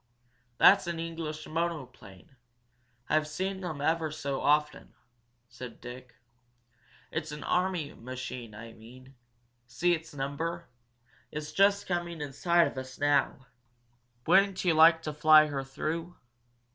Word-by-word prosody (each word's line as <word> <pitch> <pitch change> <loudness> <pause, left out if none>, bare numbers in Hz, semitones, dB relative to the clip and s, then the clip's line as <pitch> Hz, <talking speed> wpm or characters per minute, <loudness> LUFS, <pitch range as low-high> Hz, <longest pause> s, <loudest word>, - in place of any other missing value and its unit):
"That's 195 -2 +6
an 170 -1 -3
English 160 -2 -5
monoplane. 135 - -5 0.7
I've 155 0 +1
seen 190 +5 -3
them 160 -6 -5
ever 160 +1 +1
so 140 -3 -4
often," 150 0 0 0.5
said 120 0 -10
Dick. 125 0 -10 1.0
"It's 160 -1 -4
an 150 - -7
army 180 -5 -1
machine, 125 -2 -7
I 115 +1 -10
mean. 125 +4 -15 0.5
See 175 +8 +1
it's 165 0 -4
number? 165 +5 -4 0.6
It's 150 0 -6
just 200 +1 +3
coming 175 -2 -3
in 145 -2 -6
sight 170 +3 +3
of 130 - -4
us 130 0 -9
now. 145 -2 +1 0.8
Wouldn't 190 +2 +3
you 175 - +4
like 165 +1 +6
to 150 - -4
fly 155 +1 +6
her 140 -2 -3
though?" 165 +6 -4
155 Hz, 130 wpm, -29 LUFS, 135-170 Hz, 1.0 s, That's